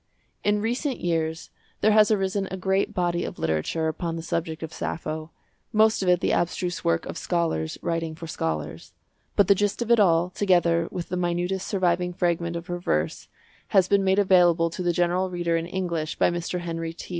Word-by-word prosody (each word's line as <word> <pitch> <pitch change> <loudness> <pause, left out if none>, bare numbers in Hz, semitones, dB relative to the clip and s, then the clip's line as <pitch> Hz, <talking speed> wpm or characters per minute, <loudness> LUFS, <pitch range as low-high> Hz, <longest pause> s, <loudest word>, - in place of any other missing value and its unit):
In 205 0 +1
recent 250 +4 -1
years 165 -1 -2 0.3
there 215 - +4
has 215 0 +6
arisen 195 -2 0
a 190 - -5
great 190 +1 0
body 175 -1 0
of - - -6
literature 80 - -1
upon 165 +1 -3
the 165 - -5
subject 165 -1 -3
of 160 0 -6
Sappho, 155 -1 -4 0.4
most 220 -1 +3
of 185 - +1
it 180 0 +4
the - - +1
abstruse 175 +1 -1
work 85 0 +1
of - - -6
scholars 80 -2 -1
writing 165 -1 -2
for 165 - -8
scholars. 80 - -4 0.4
But 200 - +4
the 200 - +7
gist 205 +1 -1
of 235 -1 -1
it 235 - +6
all, 175 -2 +3
together 175 -4 +2
with 175 - -6
the 180 - -2
minutest 180 +2 -1
surviving 180 -2 0
fragment 170 -1 0
of 170 0 -5
her 175 -1 -4
verse, 80 - -1 0.4
has 190 -2 +4
been 200 0 +3
made 190 0 +2
available 175 -4 +4
to 180 - -5
the 175 -1 +1
general 175 +2 +1
reader 175 -2 -1
in 165 0 -1
English 170 -4 -2
by - - +3
Mr. 175 +1 -3
Henry 165 -1 -4
T. - - -10
175 Hz, 195 wpm, -25 LUFS, 165-190 Hz, 0.4 s, the